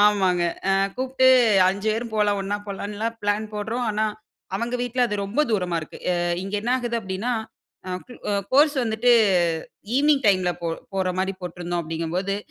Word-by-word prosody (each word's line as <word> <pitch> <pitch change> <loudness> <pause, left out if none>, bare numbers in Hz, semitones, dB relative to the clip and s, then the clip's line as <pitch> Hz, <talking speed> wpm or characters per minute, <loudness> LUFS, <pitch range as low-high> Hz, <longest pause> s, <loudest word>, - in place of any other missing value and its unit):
ஆமாங்க. 190 -4 +4 0.3
ஆ - - +4 0.2
கூப்ட்டு 260 0 +1 0.4
5 200 +3 -1
பேரும் 230 0 -4
போலாம், 205 -1 +2
ஒண்ணா 200 +1 -2
போலான்லாம் 210 +3 -4
பிளான் 205 +1 0
போடுறோம். 225 +4 -2
ஆனா, 215 +1 0 0.5
அவுங்க 235 +3 -2
வீட்ல 245 +1 -2
அது 210 -2 -2
ரொம்ப 215 +9 0
தூரமா 180 -5 0
இருக்கு. 155 - -10
அ - - +1 0.3
இங்க 195 +2 -5
என்ன 240 - -1
ஆகுது 240 -2 -2
அப்பிடின்னா, 195 +4 -3 0.5
அ - - -4 0.2
குல் 245 - -13
அ - - +1 0.2
கோர்ஸ் 290 +2 +5
வந்துட்டு 225 +2 +3 0.8
ஈவ்னிங் 285 -2 +3
டைம்ல 185 -3 +3
போ 170 - -1 0.3
போறமாரி 190 0 -1
போட்டிருந்தோம் 175 0 -3
அப்பிடிங்கம்போது, 165 +5 -2
205 Hz, 160 wpm, -24 LUFS, 190-235 Hz, 0.8 s, கோர்ஸ்